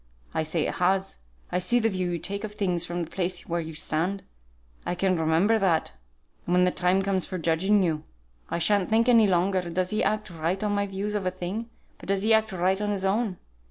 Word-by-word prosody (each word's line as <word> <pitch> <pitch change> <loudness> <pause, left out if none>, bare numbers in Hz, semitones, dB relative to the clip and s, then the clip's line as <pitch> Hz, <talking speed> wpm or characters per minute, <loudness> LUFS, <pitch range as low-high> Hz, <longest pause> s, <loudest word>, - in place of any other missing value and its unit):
I - - 0
say 155 0 -1
it - - -2
has. 190 +2 0 0.3
I 180 - +1
see 185 +7 +1
the 225 -2 +2
view 185 -4 -1
you 175 - -1
take 200 +5 -3
of 210 -1 -6
things 180 -4 0
from 175 0 -3
the 165 - -9
place 180 -1 -2
where 170 0 -1
you 160 -1 -7
stand. 180 +6 -1 0.6
I 175 - -2
can 185 0 +1
remember 165 +7 +2
that, 175 -5 +1 0.5
when 180 +1 +3
the 180 - +3
time 185 +2 +2
comes 190 -2 0
for 185 - -4
judging 180 +5 +2
you; 160 -3 0 0.5
I - - -1
sha'n't 190 +2 +2
think 225 +2 +3
any 230 -3 +6
longer, 185 +1 +2
does 180 +2 -1
he 215 - +1
act 215 -2 -1
right 170 +4 -2
on 210 -1 0
my 200 0 0
views 200 +2 -3
of 200 -3 -1
a - - +4
thing, 185 +6 -5 0.3
but - - -12
does 195 0 +1
he 220 +1 +4
act 220 -1 +3
right 190 +2 0
on 210 - -1
his 195 -2 -1
own. 200 -1 0
190 Hz, 230 wpm, -26 LUFS, 175-205 Hz, 0.6 s, any